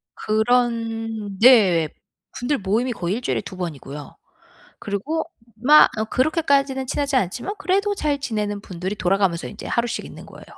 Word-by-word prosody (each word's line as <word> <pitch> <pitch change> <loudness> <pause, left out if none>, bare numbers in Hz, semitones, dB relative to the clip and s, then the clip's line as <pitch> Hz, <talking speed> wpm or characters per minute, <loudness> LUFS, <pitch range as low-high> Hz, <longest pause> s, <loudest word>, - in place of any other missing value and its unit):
그런 225 -2 -1
네. 195 -10 +6 0.5
분들 275 +4 0
모임이 220 +6 0
거의 185 -2 -2
1 240 - -3
주일에 - - -1
2 185 - -9
번이고요. 150 -4 -7 0.6
그리고 235 +10 -2 0.3
막 290 +7 +7
어 215 - 0
그렇게까지는 275 -1 +1
친하지 285 0 -1
않지만 245 - -1
그래도 400 +1 0
잘 295 -5 -1
지내는 210 -6 -2
분들이 185 +1 -5
돌아가면서 185 -2 0
인제 205 - -9
하루씩 235 0 -1
있는 - - -11
거예요. - - -13
225 Hz, 335 characters per minute, -22 LUFS, 195-265 Hz, 0.6 s, 막